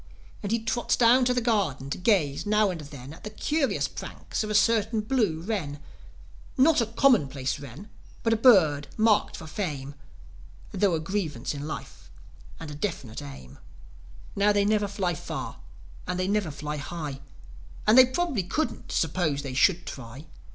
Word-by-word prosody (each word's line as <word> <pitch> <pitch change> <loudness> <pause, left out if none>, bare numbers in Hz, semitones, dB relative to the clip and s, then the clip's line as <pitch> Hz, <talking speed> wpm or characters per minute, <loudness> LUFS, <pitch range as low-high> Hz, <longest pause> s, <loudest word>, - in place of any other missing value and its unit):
And 205 - -4
he 230 - +3
trots 225 +2 0
down 245 +2 +5
the 250 0 +2
garden 190 - 0
to - - -2
gaze 165 -6 +1
now 210 -1 +3
and 170 -3 -6
then 140 -2 -10
At - - -15
the 210 - -5
curious 290 +6 0
pranks - - -5
of 215 - -4
a 210 - -1
certain 220 0 +3
blue 210 -9 0
wren: 170 -8 -3 0.8
Not 280 +1 +5
a 230 - 0
commonplace 145 - +2
wren, 140 - -10 0.4
but 230 - +3
a - - +4
bird 180 - +5
marked 215 -1 +3
for - - -9
fame 150 -6 -4 0.8
Thro' 190 -2 +2
a - - -1
grievance 160 - -3
in 145 +1 -6
life 155 - -8 0.5
and 160 -2 -7
a - - -6
definite 145 - -4
aim. 65 -3 -11 0.8
Now, 200 +1 +4
they 205 -1 +2
never 210 -1 +2
fly 195 -3 -1
far 150 - -6 0.5
and 180 0 -2
they 185 - 0
never 200 -3 0
fly 150 +1 -5
high, 150 -2 -5 0.7
And 215 - +5
they 255 0 +9
probably 270 - -1
couldn't, 305 - -3
suppose 160 -3 0
they 135 -2 -5
should 175 +7 +3
try. 130 +3 -9
190 Hz, 165 wpm, -27 LUFS, 145-220 Hz, 0.8 s, they